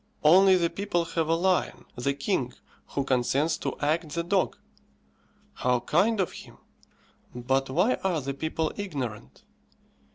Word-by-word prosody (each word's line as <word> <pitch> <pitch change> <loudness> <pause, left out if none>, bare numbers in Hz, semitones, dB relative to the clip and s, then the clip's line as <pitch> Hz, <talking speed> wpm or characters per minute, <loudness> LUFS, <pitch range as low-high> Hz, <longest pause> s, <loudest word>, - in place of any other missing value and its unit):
Only 190 +5 +7
the 170 -2 +1
people 195 -4 -1
have 165 -1 -1
a 165 - +3
lion, 185 +2 0
the 135 +3 -1
king, 135 - -1 0.3
who 140 - -2
consents 135 +4 +1
to - - -3
act 155 +2 0
the 170 - -1
dog. 185 +2 0 1.0
How 125 -1 0
kind 205 - +2
of 185 - 0
him! - - -12 0.8
But 130 +2 0
why 180 - +2
are 185 -4 +1
the 140 0 -4
people 160 +2 -2
ignorant? 125 - -6
160 Hz, 140 wpm, -27 LUFS, 135-185 Hz, 1.0 s, Only